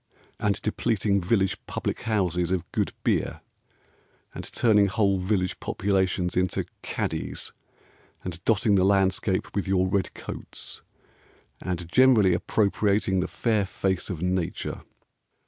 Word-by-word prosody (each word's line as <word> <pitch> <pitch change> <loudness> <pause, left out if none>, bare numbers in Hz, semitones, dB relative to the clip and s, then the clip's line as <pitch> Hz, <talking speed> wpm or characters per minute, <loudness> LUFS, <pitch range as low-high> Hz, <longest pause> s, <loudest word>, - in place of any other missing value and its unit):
And 100 -1 +1
depleting 105 -2 +1
village 95 +1 +1
public - - -3
houses 90 -6 0
of 95 -3 -2
good - - 0
beer, - - 0 0.9
And - - -6
turning 105 -4 +4
whole 100 -1 +2
village 90 -1 0
populations 95 -2 0
into 90 0 0 0.2
caddies, - - -3 0.7
And 90 -1 -6
dotting 105 -1 +3
the 95 -2 +4
landscape 95 0 +1
with 100 -1 -1
your 95 -1 +2
red 95 -1 -1
coats, - - -8 0.8
And 90 -2 -3
generally 110 -3 +5
appropriating 100 0 +1
the 90 - 0
fair 110 -4 +1
face 95 -1 -2
of 90 -3 -4
Nature. 90 -2 -2
95 Hz, 120 wpm, -26 LUFS, 90-105 Hz, 0.9 s, generally